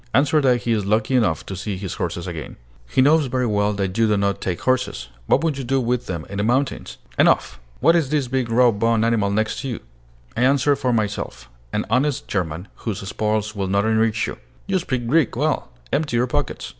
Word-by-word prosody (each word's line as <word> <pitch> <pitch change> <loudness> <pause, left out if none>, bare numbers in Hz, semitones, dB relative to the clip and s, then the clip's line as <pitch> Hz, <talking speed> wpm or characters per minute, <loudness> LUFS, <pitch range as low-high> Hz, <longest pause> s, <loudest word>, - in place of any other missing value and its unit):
"Answer 150 +3 +4
that 125 -3 +2
he 120 - 0
is 110 -3 +1
lucky 110 +5 +1
enough 95 -11 +1
to 95 - -6
see 100 +1 -4
his 95 -2 -5
horses 85 0 -3
again." 85 -4 -6 0.3
"He 130 - +3
knows 150 0 +4
very 125 0 0
well 105 -2 +1
that 95 -2 -2
you 115 -1 +3
do 105 -1 +2
not 100 -1 0
take 90 -2 -2
horses. 130 - -1 0.2
What 145 - +3
would 155 -4 0
you - - -3
do 135 +2 +1
with 125 0 -1
them 85 -4 -4
in 100 0 -5
the - - +1
mountains?" 130 +5 -1 0.2
"Enough! - - +3 0.2
What 165 +5 +5
is 160 -6 +1
this 145 -3 0
big 130 -1 -1
raw 120 +1 +5
boned 115 +1 +1
animal 115 -4 +2
next 110 +2 -1
you?" 125 -5 -3 0.6
I 120 - -1
answered 140 +2 +3
for 130 -3 0
myself: 105 - -3 0.2
"An - - -1
honest 135 +3 +1
German, 90 -1 -3
whose 100 -4 -5
spoils 110 +1 -1
will 100 -1 -2
not 100 +2 +1
enrich 110 0 +2
you." - - -6 0.3
"You 195 -1 +1
speak 130 -8 -3
Greek 145 +3 +2
well. 150 0 0 0.2
Empty 145 -4 +1
your 120 - +3
pockets." 125 - -3
115 Hz, 215 wpm, -22 LUFS, 100-130 Hz, 0.6 s, What